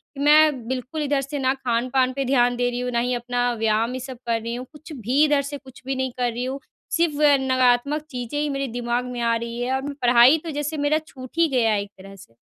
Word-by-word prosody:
कि - - -9
मैं 295 -5 +4
बिल्कुल 260 +4 -4
इधर 285 -1 +1
से 280 +1 -5
ना 260 0 +2
खान-पान 255 0 0
पे 275 0 -2
ध्यान 245 -2 +3
दे 245 0 0
रही 245 0 -4
हूँ 250 0 -2
ना 235 - +1
ही 250 +1 0
अपना 245 0 -1
व्यायाम 225 +2 +1
ये 255 - -4
सब 255 -1 -8
कर 230 -1 0
रही 230 +1 -4
हूँ, 250 +1 -6
कुछ 310 +2 -13
भी 260 +4 +1
इधर 290 -2 +2
से 285 +1 -6
कुछ 260 -2 -16
भी 270 0 -2
नहीं 260 -1 -2
कर 245 -1 0
रही 240 +2 -4
हूँ 270 +2 -4 0.4
सिर्फ़ 335 -3 +1 0.3
नकारात्मक 255 +3 +2
चीज़ें 250 +3 -4
ही 300 0 0
मेरे 275 -1 -2
दिमाग 240 +1 -2
में 245 - -5
आ 230 0 +2
रही 235 +1 -5
है 255 +2 -1
और 265 - -1
मैं 285 +1 -5
पढ़ाई 245 +4 +6
तो 325 - -5
जैसे 300 +1 -3
मेरा 290 +1 +2
छूट 255 -2 -10
ही 335 - +4
गया 235 -4 +2
है 205 -1 +1
एक 200 - -14
तरह 195 +1 -12
से। 115 -11 -17
255 Hz, 260 wpm, -23 LUFS, 240-280 Hz, 0.4 s, पढ़ाई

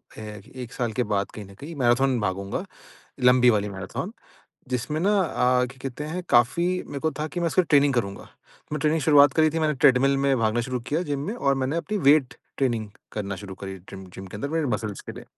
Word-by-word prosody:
फ़े 105 -2 -8 0.2
1 120 - -10
साल 120 -2 -2
के - - +4
बाद 100 0 0
कहीं 105 - -8
न 100 - -14
कहीं 160 +4 -8
मैराथन 130 0 +2
भागूँगा 100 -1 -2 0.6
लंबी 125 0 +6
वाली 105 -2 +1
मैराथन 95 - -5 0.6
जिसमें 130 +5 -2
ना 200 +4 +3
अ, 125 -7 +2
क्या 130 +1 -13
कहते 135 +2 -5
हैं 170 +4 -4
काफ़ी 125 +9 +3 0.2
मेरे 140 - -5
को 160 +2 +1
था 155 - -1
कि 175 - -4
मैं 170 - +1
उसका 185 - +3
ट्रेनिंग 145 -4 +3
करूँगा। 100 -5 -2 0.4
मैं 150 - -1
ट्रेनिंग 155 +2 +2
की - - -3
शुरुआत 145 -2 +6
करी 155 -1 +4
थी 165 - -2
मैंने 155 -2 +1
ट्रेडमिल 135 +1 +4
में 135 -1 +2
भागना 110 +1 +1
शुरू 125 +1 -3
किया 155 +4 +1
जिम 145 -5 -3
में 210 - -2
और 140 - +1
मैंने 135 +5 -1
अपनी 210 +5 -2
वेट 140 -2 +5 0.2
ट्रेनिंग 115 -5 0 0.2
करना 100 -2 -4
शुरू 95 -1 -8
करी 95 0 -5
ट्रीम 95 -1 -9
जिम 95 - -8
के 95 - -8
अंदर 125 +7 -3
मेरे 160 0 0
मसल्स 110 -4 -3
के - - -8
लिए। - - -10
130 Hz, 225 wpm, -25 LUFS, 110-150 Hz, 0.6 s, लंबी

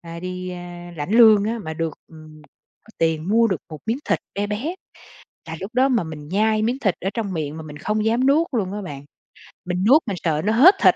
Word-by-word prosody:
a, 170 0 -9
đi, 185 0 -5
a, 175 -1 -8
lãnh 145 +3 -4
lương 220 -2 +7
á 230 +2 -2
mà 160 - -5
được, 165 -1 -3
ừm, 155 -1 -14 0.6
tiền 160 0 0
mua 230 +3 +4
được 190 -8 -1
một 155 - -7
miếng 230 +3 0
thịt - - +1 0.2
be 205 +1 -1
bé, 230 - -3 0.7
là 165 - -5
lúc 200 +5 -7
đó 260 +2 +4
mà 245 -6 +2
mình 150 -2 -8
nhai 215 +4 +1
miếng 240 +4 0
thịt 200 -9 +1
ở 190 - -2
trong 215 -5 -3
miệng 155 -3 -3
mà 160 - -7
mình 150 -1 -10
không 210 +4 -1
dám 235 +4 +2
nuốt 305 +5 +4
luôn 195 -4 -1
á 205 0 -4
bạn, 145 -6 -8 0.6
mình 180 +1 -2
nuốt 290 +7 +7
mình 200 -4 -2
sợ 155 -2 +1
nó 215 - +2
hết 320 - +7
thịt, - - +6
190 Hz, 235 wpm, -22 LUFS, 165-225 Hz, 0.7 s, lương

